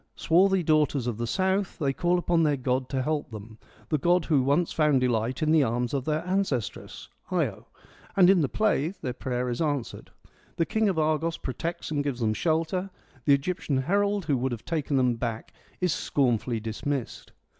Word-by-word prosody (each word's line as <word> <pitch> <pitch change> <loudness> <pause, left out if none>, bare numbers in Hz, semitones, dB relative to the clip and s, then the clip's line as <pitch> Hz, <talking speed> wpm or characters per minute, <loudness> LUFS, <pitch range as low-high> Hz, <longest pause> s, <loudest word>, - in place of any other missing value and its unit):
Swarthy 190 +2 +3
daughters 150 -4 +2
of 120 -3 -3
the 120 - -2
South, 190 - 0
they 140 -5 0
call 175 +5 +1
upon 175 -1 +1
their 150 -3 +2
god 130 0 -1
to 130 -2 -1
help 150 +1 -2
them, 110 0 -10 0.3
the 155 - +1
god 175 +3 +2
who 150 -5 +3
once 145 +6 +1
found 150 -4 +3
delight 125 +3 0
in 155 - +2
the 160 -1 +5
arms 120 0 -1
of 135 -2 -1
their 155 +2 -1
ancestress, 180 - -2 0.2
Io; - - -2 0.5
and 185 -2 +7
in 190 -2 +5
the 140 - 0
play 195 -5 0
their 125 - -2
prayer 125 0 -3
is 120 +3 -2
answered. 145 -6 -2 0.5
The 165 - +1
King 220 +2 +1
of 185 - -1
Argos 155 +1 0
protects 165 +7 -5
and 145 -2 0
gives 140 -4 -3
them 110 -2 +1
shelter, 165 - -1 0.4
the 140 - +6
Egyptian 145 -1 -2
herald 200 +7 +1
who 140 - +1
would 125 0 -1
have 115 - -8
taken 150 -4 -1
#iem 125 -2 +2
back 115 -2 -4 0.3
is 180 -3 +2
scornfully 120 -3 0
dismissed. 115 +4 -4
145 Hz, 190 wpm, -27 LUFS, 125-170 Hz, 0.5 s, and